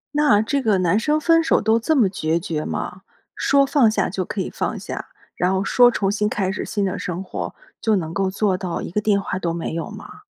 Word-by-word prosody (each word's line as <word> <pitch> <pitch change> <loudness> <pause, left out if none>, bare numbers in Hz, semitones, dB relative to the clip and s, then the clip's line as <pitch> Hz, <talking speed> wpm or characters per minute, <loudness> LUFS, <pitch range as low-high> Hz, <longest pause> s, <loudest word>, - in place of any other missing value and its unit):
那 290 -8 +4
这 275 +5 0
个 215 -5 +2
男 185 +3 +2
生 300 +5 +1
分 330 +1 +4
手 325 - +3
都 220 +1 +2
这 315 +8 +1
么 240 -8 +4
决 165 -3 -1
绝 160 -3 -3
吗？ 185 - -4 0.3
说 280 0 +3
放 275 -5 +4
下 215 - 0
就 190 -1 -2
可 195 +2 -4
以 - - -3
放 - - -3
下， - - -6 0.3
然 180 +1 +1
后 190 0 0
说 245 +5 +5
重 200 -4 0
新 210 0 0
开 195 -6 -1
始 200 - -4
新 205 -2 -1
的 185 - -2
生 180 +1 -4
活， - - -5 0.3
就 220 -1 +2
能 165 -4 -3
够 190 +1 0
做 195 -1 0
到 180 -2 -4
一 - - -6
个 210 - 0
电 205 -1 +2
话 185 -2 -3
都 170 -2 -1
没 170 -1 -4
有 165 - -4
吗？ - - -11
200 Hz, 260 characters per minute, -21 LUFS, 185-230 Hz, 0.3 s, 说